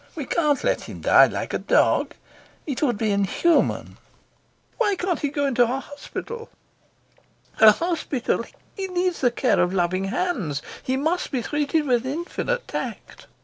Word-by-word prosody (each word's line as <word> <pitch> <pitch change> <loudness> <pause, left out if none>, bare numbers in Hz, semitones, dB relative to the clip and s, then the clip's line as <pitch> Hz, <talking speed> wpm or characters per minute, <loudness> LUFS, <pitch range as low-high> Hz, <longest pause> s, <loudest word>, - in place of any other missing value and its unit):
We 300 -4 -4
can't 300 -1 +1
let - - 0
him - - -9
die - - +6
like - - -4
a - - 0
dog. - - +2 0.5
It 280 -5 -4
would 245 -8 +1
be 215 0 0
inhuman." 200 - +1 0.8
"Why 415 -4 +2
can't 360 -1 -1
he 290 - -1
go 285 -1 0
to 245 - +2
a 255 +3 -1
hospital?" 375 - -8 1.1
"A 220 -1 +9
hospital! 310 -5 -1 0.3
He 390 -2 -3
needs 360 -1 -1
the 250 - +4
care 240 0 +1
of 180 +2 +1
loving 185 +1 0
hands. 195 - -2 0.2
He 260 +1 -1
must 320 +6 -1
be 255 -4 -2
treated 295 +3 0
with 245 -3 +2
infinite 345 - -3
tact." - - -6
285 Hz, 155 wpm, -23 LUFS, 235-345 Hz, 1.1 s, A